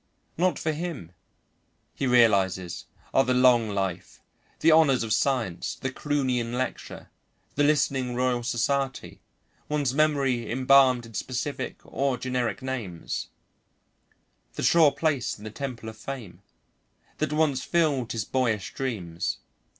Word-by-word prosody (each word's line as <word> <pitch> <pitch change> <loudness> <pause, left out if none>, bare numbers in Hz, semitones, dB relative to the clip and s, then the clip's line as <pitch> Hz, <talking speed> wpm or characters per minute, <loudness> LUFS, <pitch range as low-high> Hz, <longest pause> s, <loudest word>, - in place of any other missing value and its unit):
Not 180 +2 +1
for 155 - -1
him, 155 - -5 0.8
he 135 - -2
realises, 100 -7 +2 0.3
are 135 - +5
the 130 -1 +1
long 125 -3 +5
life, 95 -3 -3 0.4
the 165 - +5
honours 150 -6 +5
of 110 -2 -1
science, 115 -9 0
the 135 - -4
Croonian 130 -5 -1
lecture, 130 -1 -5 0.4
the 145 - +1
listening 135 -4 +1
Royal 125 -1 +1
Society, 130 +3 -2 0.5
one's 145 -4 0
memory 135 -6 +1
embalmed 130 -1 +4
in 115 - -13
specific 130 +5 -4
or 135 -2 -1
generic 125 0 -2
names, 115 -11 -4 1.3
the - - -4
sure 160 -4 +6
place 145 -6 -1
in 105 - -14
the 110 - -7
temple 125 -2 -6
of 110 0 -8
fame, 110 -7 -8 0.8
that 155 -1 0
once 150 -4 +1
filled 150 -8 +1
his 115 - -2
boyish 115 -7 -1
dreams. 95 -11 -3
130 Hz, 125 wpm, -26 LUFS, 115-140 Hz, 1.3 s, sure